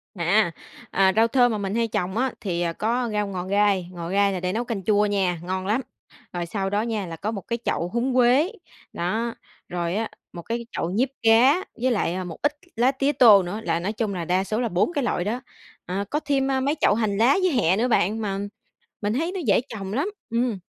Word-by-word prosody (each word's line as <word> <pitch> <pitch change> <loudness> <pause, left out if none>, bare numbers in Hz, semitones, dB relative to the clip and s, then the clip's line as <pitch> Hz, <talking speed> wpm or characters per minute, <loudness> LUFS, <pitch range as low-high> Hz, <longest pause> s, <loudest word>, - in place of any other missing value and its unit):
À, 175 +2 +2 0.4
à, 190 0 +4
rau 225 +1 +5
thơm 245 -1 +3
mà 215 - -1
mình 200 +1 -3
hay 230 -1 +1
trồng 190 0 -2
á 260 +1 +1
thì 175 -4 -1 0.2
có 235 +2 0
rau 210 -1 0
ngò 185 -2 -4
gai, 200 -2 +2
ngò 170 -1 -6
gai 200 0 +2
là 185 - -2
để 180 +1 -2
nấu 235 +2 -1
canh 215 -6 -4
chua 210 0 +3
nha, 190 -4 0
ngon 185 +1 -3
lắm. 225 +6 +1 0.5
Rồi 175 -1 -2
sau 195 +2 -2
đó 205 +1 +1
nha 220 -4 -2
là 165 -1 -6
có 215 +6 -3
1 200 -4 -5
cái 235 -1 -2
chậu 170 - 0
húng 250 +2 0
quế, 255 - +4 0.4
đó, 225 +7 -1 0.4
rồi 175 +1 -2
á, 225 +1 -1 0.2
1 170 - -7
cái 235 +4 -4
chậu 170 - -2
diếp 260 +2 +2
cá 255 +10 +5 0.2
với 255 0 +2
lại 185 -4 -1
một 165 - -8
ít 290 - +2 0.2
lá 245 +4 +3
tía 275 +1 +1
tô 220 -8 +7
nữa, 190 +5 -4
là 170 - 0
nói 200 +5 -2
chung 215 -3 -2
là 170 -2 -3
đa 185 +3 +1
số 215 +3 -2
là 235 - 0
4 185 - +1
cái 285 -4 0
loại 175 - 0
đó. 235 +6 -2 0.4
À, 195 +3 -3
có 300 - 0
thêm, 275 -2 0
a, 265 - +1
mấy 285 +4 0
chậu - - +5
hành 215 -3 0
lá 250 - +4
với 365 - +3
hẹ 190 - +2
nữa 245 +3 +2
bạn, 220 -1 +1
mà 195 -2 -2 0.6
mình 205 +1 0
thấy 330 +8 -1
nó 375 - -3
dễ 200 - +4
trồng 200 -3 -6
lắm. 290 - 0 0.2
Ừm. 235 -3 0
210 Hz, 235 wpm, -24 LUFS, 190-240 Hz, 0.6 s, tô